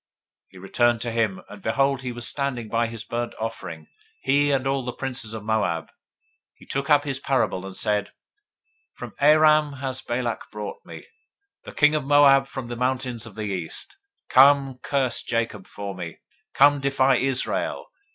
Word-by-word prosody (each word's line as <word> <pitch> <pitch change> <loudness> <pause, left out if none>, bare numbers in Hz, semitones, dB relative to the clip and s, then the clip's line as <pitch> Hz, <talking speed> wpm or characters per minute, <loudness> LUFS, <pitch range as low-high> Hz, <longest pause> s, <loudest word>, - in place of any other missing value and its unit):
023:006 - - -53
He 95 - -16
returned 115 +5 +1
to 120 - -2
him, 110 -4 -1
and 105 - -12
behold, 135 +4 +1
he 125 -1 -4
was 120 0 -3
standing 130 -5 -2
by 115 +1 +1
his 115 -1 -7
burnt 120 0 -4
offering, 115 +1 -6 0.4
he, 145 +1 +3
and 135 -1 0
all 135 0 0
the 125 - -3
princes 125 -4 -3
of 110 - -7
Moab. 105 -7 0
023:007 - - -27 0.6
He - - -17
took 140 +2 -3
up 145 -1 +5
his 135 -2 -3
parable, 130 -9 0
and 95 - -9
said, 105 -2 0 0.8
From 120 -3 -9
Aram 155 0 +5
has 130 -1 -4
Balak 120 -1 -3
brought 105 -1 -7
me, 80 -1 -11 0.6
The - - -8
king 150 0 +4
of 155 -2 0
Moab 135 -1 +5
from 135 -2 -6
the 120 0 -6
mountains 125 -1 -2
of 105 - -13
the 110 - -5
East: 95 - -4 0.3
Come, 135 -1 +5
curse 130 -4 0
me - - -13
Jacob, 115 -4 -2 0.9
Come, 145 +1 +5
defy 135 -1 +3
Israel. 135 -1 -1
125 Hz, 170 wpm, -24 LUFS, 115-140 Hz, 0.9 s, up